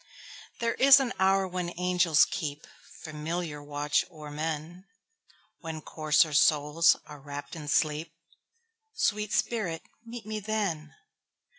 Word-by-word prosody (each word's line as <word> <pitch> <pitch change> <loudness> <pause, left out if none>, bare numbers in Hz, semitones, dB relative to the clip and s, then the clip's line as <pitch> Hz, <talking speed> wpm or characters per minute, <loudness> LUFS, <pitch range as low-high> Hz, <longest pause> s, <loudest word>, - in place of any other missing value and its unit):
There 230 0 0
is 275 +1 +7
an 260 -3 -1
hour 190 0 +3
when 180 -1 -4
angels 180 -3 +4
keepFamiliar 155 0 -6
watch 145 0 0
o'er 155 -4 -10
men, 160 +4 -5 0.7
When 160 -1 -6
coarser 155 0 +1
souls 150 +3 +4
are 150 -1 -11
wrapp'd 145 +3 -8
in 155 -2 -8
sleep—Sweet 210 - -3
spirit, 195 -10 -1 0.2
meet 235 -1 -9
me 215 0 -4
then! 195 -8 -3
165 Hz, 110 wpm, -28 LUFS, 150-205 Hz, 0.7 s, is